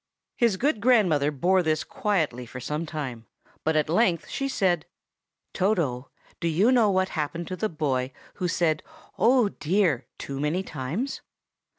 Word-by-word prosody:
His 230 -5 +2
good 250 -2 +1
grandmother 185 - +4
bore 180 +6 +2
this 155 -2 0
quietly 155 - -1
for 125 - -8
some 150 +6 -3
time; 130 -8 -5 0.4
but 160 0 +1
at 155 -1 +2
length 175 0 +2
she 275 - -2
said, 185 - +1 0.7
"Toto, 155 - 0 0.3
do 170 - -1
you 185 +9 +3
know 235 -5 +4
what 190 -1 +2
happened 165 +2 -3
to 185 - -3
the 215 +3 -1
boy 135 -5 -1 0.3
who 180 - +2
said 165 -2 +1 0.4
'Oh, 245 -2 +4
dear!' 170 - 0
too 135 -1 -5
many 155 +6 0
times?" 165 - -4
170 Hz, 155 wpm, -26 LUFS, 150-200 Hz, 0.7 s, grandmother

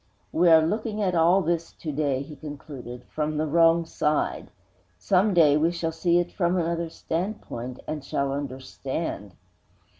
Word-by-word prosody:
We 175 +1 +4
are 160 -1 +7
looking 215 +4 -2
at 185 -2 +1
all 175 +3 +4
this 170 0 -1
to 155 - -6
day,' 140 -2 0
he 150 +2 -10
concluded, 140 -5 -9
'from 150 +2 -3
the 155 - +1
wrong 165 +2 +4
side. 150 -1 -1 0.5
Some 195 - +2
day 155 -4 +6
we 160 +2 +3
shall 165 -1 -2
see 170 +2 +2
it 175 0 0
from 180 0 +1
another 170 -1 -1
standpoint, 160 - -4
and 155 -2 -4
shall 140 0 -1
understand.' 130 - -5
160 Hz, 155 wpm, -26 LUFS, 145-170 Hz, 0.5 s, are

